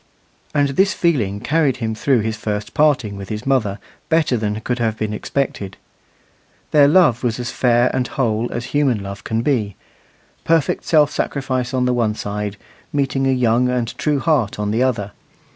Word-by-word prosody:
And 145 -1 +3
this 190 +9 +2
feeling 115 - 0
carried 145 +1 +1
him 110 -2 -2
through 120 +2 +1
his 110 +1 -2
first 105 -1 -4
parting 135 -10 +2
with 100 -1 -8
his 105 +2 -5
mother 115 -8 +1 0.3
better 160 -5 +2
than 105 -2 -2
could 125 +2 -2
have 110 -2 0
been 110 -1 -2
expected. 105 -5 -3 0.9
Their 145 -2 +6
love 150 -7 +4
was 120 -1 -1
as 120 -1 -3
fair 120 0 +2
and 125 -2 0
whole 115 -3 -1
as 120 0 -4
human 135 -8 +1
love 100 +1 -7
can 115 +1 -1
be 110 - 0 0.7
perfect 165 -3 +1
self 150 -3 +4
sacrifice 130 -3 -2
on 130 -2 0
the 125 - +2
one 115 -3 0
side 105 -1 -4 0.3
meeting 135 -1 0
a - - +3
young 125 -1 +2
and 125 -2 -2
true 150 -2 +1
heart 140 - +1
on 105 0 -2
the 115 +3 0
other. 110 -6 0
120 Hz, 175 wpm, -19 LUFS, 110-140 Hz, 0.9 s, Their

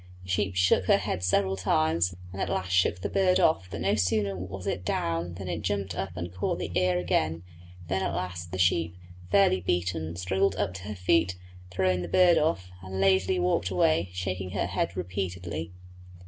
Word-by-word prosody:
The 90 - -13
sheep 95 0 0
shook 90 0 +3
her - - +5
head 90 - -3
several 95 +1 +2
times 85 -1 +1 0.2
and 95 - -5
at - - -1
last 95 -1 -2
shook 90 0 +2
the - - -1
bird 185 -1 +3
off; 160 - +3
but - - -6
no 100 +1 +2
sooner 100 0 +1
was 95 0 -7
it 90 - -2
down 85 0 -2
than 95 0 -7
it 85 -2 -3
jumped 100 -3 -2
up 95 -1 -5
and 85 +1 -5
caught 90 - -1
the - - -4
ear 90 -1 +2
again; 85 -2 0 0.4
then 95 +2 0
at 85 - -1
last 90 -1 -4
the 95 - -4
sheep, 85 -1 +2 0.3
fairly 95 -1 +4
beaten, 85 -2 -1
struggled 95 +2 +1
up 100 -2 -1
to 95 0 -8
her 105 - -4
feet, 90 -1 +2 0.3
throwing 90 0 +1
the 90 - -4
bird 175 - +5
off, 95 - -1
and 95 +1 -6
lazily 95 -1 +3
walked 90 0 +1
away, 85 -1 +2
shaking 90 +1 -3
her 100 - 0
head 90 0 -2
repeatedly. 90 -3 -4
90 Hz, 195 wpm, -28 LUFS, 90-95 Hz, 0.4 s, her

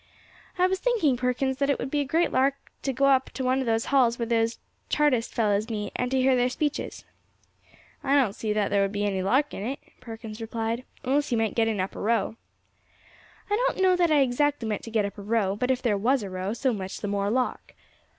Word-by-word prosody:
"I 365 - +4
was 375 0 0
thinking, 425 - +2
Perkins, 250 +2 -1
that 280 0 0
it 280 - +2
would 265 - -5
be 295 - +1
a 285 - 0
great 330 +5 +1
lark 270 +2 +2 0.3
to 270 - -1
go 270 +2 +1
up 265 -1 +3
to 265 - -4
one 255 +1 +2
of 260 - -2
those 225 0 +1
halls 240 -4 +4
where 235 - -1
those 230 0 +1 0.3
Chartist 280 -6 +2
fellows 210 0 +1
meet, 210 -2 -3
and 250 - -1
to 265 0 +1
hear 260 0 +4
their 250 0 +2
speeches." 295 +3 -3 1.0
"I 275 +1 +2
don't 255 -8 +3
see 215 0 -3
that 210 -1 +1
there 200 0 +2
would 195 0 +1
be 205 0 -1
any 195 -2 0
lark 265 +10 +1
in 195 - -5
it," 265 +5 -3 0.2
Perkins 225 -2 -8
replied, 225 +2 -3 0.2
"unless 280 +2 +1
you 235 - +2
meant 225 -1 0
getting 225 -3 +1
up 185 +1 -2
a - - -6
row." 225 0 0 1.1
"I 410 - +1
don't - - 0
know 370 -1 +5
that 350 -1 +2
I 300 -2 +4
exactly 270 -1 +1
meant 210 -1 -2
to - - -7
get 220 -2 +1
up 200 +1 -6
a - - -6
row; 200 -2 0
but 250 +5 -1
if 260 -1 0
there 210 -5 +1
was 250 +3 +2
a 195 - -6
row, 185 +2 -3
so 255 +1 0
much 190 -3 -5
the 205 - -3
more 200 0 0
lark." 250 +3 -2
245 Hz, 240 wpm, -26 LUFS, 215-270 Hz, 1.1 s, know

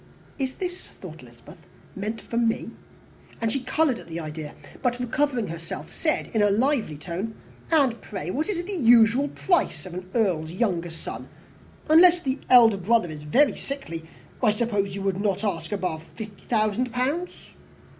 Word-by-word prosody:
"Is 265 -1 -2
this," 360 0 -5
thought - - -11
Elizabeth, - - -15 0.4
"meant 215 +3 -4
for - - -8
me?" 230 -1 0 0.7
and 225 -1 0
she 275 - 0
coloured 265 +1 +1
at - - -12
the 165 0 -5
idea; 155 -1 -6 0.3
but, 250 -1 0
recovering 250 - 0
herself, 165 0 -6
said 310 -2 -1
in 220 - +2
a 205 - +5
lively 230 - +1
tone, 185 +8 -5 0.3
"And 275 -8 +3
pray, 185 -5 -5
what 305 - -1
is 350 -4 -1
the 405 - -5
usual 240 -1 +5
price 290 - 0
of 185 - -8
an 180 +1 -7
earl's 180 -9 +1
younger 175 -3 -1
son? 165 - -8 0.6
Unless 345 +3 +7
the 265 -2 -2
elder 230 -5 +7
brother 195 -2 +2
is 150 -1 -8
very 260 - +3
sickly, 270 - -6 0.4
I 240 - +4
suppose 205 -3 0
you 200 - -4
would 195 0 0
not 200 -1 0
ask 165 -6 -2
above 180 -6 -2
fifty 205 +4 -10
thousand 220 +2 +1
pounds." 275 +9 0
225 Hz, 165 wpm, -25 LUFS, 185-265 Hz, 0.7 s, Unless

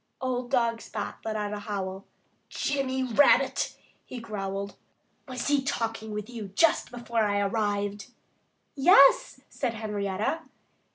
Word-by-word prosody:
Old 250 -1 -2
dog 235 -3 +1
Spot 210 -2 -6
let 220 -1 -3
out 210 -1 -2
a 210 - -4
howl. 195 -2 -5 0.4
"Jimmy 265 -2 -1
Rabbit!" 255 +3 +3 0.3
he 255 - -8
growled. 200 -3 -4 0.5
"Was 255 -2 -4
he 290 -1 +3
talking 225 -4 -2
with 210 0 -4
you 230 -4 -7
just 330 - +3
before 235 -1 -3
I 205 -1 +1
arrived?" 205 0 -1 0.7
"Yes!" 275 -3 +6
said 240 -4 -3
Henrietta. 210 +4 -2
225 Hz, 125 wpm, -27 LUFS, 205-255 Hz, 0.7 s, Yes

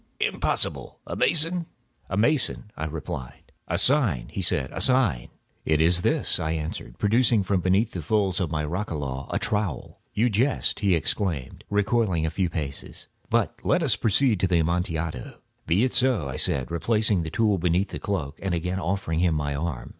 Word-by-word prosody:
Impossible! - - -1
A - - -5
mason?" 165 +1 +2 0.4
"A 95 - -2
mason," 120 -3 +1
I 80 - -4
replied. 70 -5 -7 0.2
"A 85 - 0
sign," 100 - +3
he 95 - -4
said. 70 -7 0 0.9
"It 80 -1 +1
is 85 +2 +4
this," - - +1
I 80 0 -1
answered, 75 -6 -5
producing 115 +1 +3
a - - -2
trowel - - -13
from - - -1
beneath 95 +6 +2
the 90 - -5
folds 100 +3 0
of 90 -5 -1
my 75 -1 -2
roquelaire. 75 -6 -4 0.9
"You 115 +3 +2
jest," 125 +7 +1
he 100 -4 +3
exclaimed, 80 - -2
recoiling 105 -5 +1
a 80 - -1
few 90 +1 0
paces. 75 -5 -6 0.2
"But - - 0
let 180 - +2
us 130 -10 +2
proceed 110 +1 +2
to 95 - +2
the 90 -1 +2
Amontillado." 85 -4 -2 0.3
"Be 90 +7 +3
it 130 - +1
so," 125 - +2
I 65 - -5
said, 65 -2 -1
replacing 105 +2 +1
the 80 - -4
tool 105 +1 +1
beneath 90 +3 +1
the - - -6
cloak, 80 -8 -3
and 95 -3 -1
again 90 +3 -2
offering 90 -3 -1
him 85 -2 +2
my 75 -1 -1
arm. 70 -2 -4
90 Hz, 175 wpm, -25 LUFS, 80-105 Hz, 0.9 s, is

